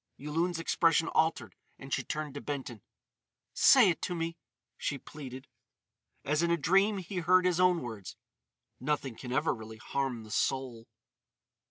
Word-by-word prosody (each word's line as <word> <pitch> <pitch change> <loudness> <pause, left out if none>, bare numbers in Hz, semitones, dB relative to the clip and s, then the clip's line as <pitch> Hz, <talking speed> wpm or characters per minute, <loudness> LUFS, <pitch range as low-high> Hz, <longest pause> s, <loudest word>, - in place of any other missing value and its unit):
Yulun's 165 +4 -1
expression 165 0 +2
altered 160 +1 0 0.2
and 135 0 -8
she - - 0
turned 150 -2 -4
to 145 - -6
Benton: 130 -7 -5 0.7
"Say 240 -9 +7
it 165 - -5
to 180 - -2
me!" 165 0 -3 0.4
she 145 - -3
pleaded. 130 -1 -10 0.8
As 150 +3 +1
in 170 - +1
a 170 - +3
dream 195 +6 +3
he 190 +1 -6
heard 180 +2 +4
his 180 -1 +2
own 180 -3 +3
words: 110 -6 -7 0.6
"Nothing 140 -5 -2
can 125 +2 -8
ever 145 +5 +1
really 110 -2 -9
harm 125 0 -3
the 110 - -12
soul." 125 -3 -1
150 Hz, 155 wpm, -31 LUFS, 130-170 Hz, 0.8 s, Say